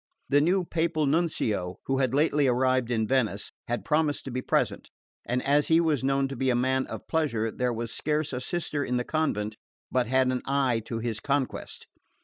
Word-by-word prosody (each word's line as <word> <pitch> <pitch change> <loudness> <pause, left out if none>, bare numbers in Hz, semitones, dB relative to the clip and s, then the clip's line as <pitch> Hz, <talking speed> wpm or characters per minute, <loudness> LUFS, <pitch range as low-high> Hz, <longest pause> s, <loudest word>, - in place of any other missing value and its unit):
The 145 +1 +5
new 180 +4 +2
Papal 165 -2 0
Nuncio, 125 - 0
who 135 - -1
was 130 -3 +1
lately 145 0 +3
arrived 130 -1 +2
in 110 -2 +1
Venice, 110 -5 0 0.2
had 120 0 -2
promised 150 -2 +1
to 135 - -5
be 130 +1 -2
present; - - 0 0.4
and 125 +1 0
as 145 +1 +3
he 165 0 +5
was 155 -6 +1
known 135 0 +2
to 135 - -5
be 130 +1 0
a 125 - +3
man 130 +2 +1
of - - -8
pleasure 115 -9 0
there 125 +2 -1
was 115 -1 -4
scarce 150 -1 -1
a 125 - -3
sister 150 -1 -2
in 125 - -1
the 125 - +1
convent 110 -9 -1 0.3
but 125 -2 +1
had 130 +1 +3
an 125 - -1
eye 135 -4 +2
to 115 - -3
his 115 -1 -3
conquest. 140 +1 -2
130 Hz, 200 wpm, -27 LUFS, 120-150 Hz, 0.4 s, The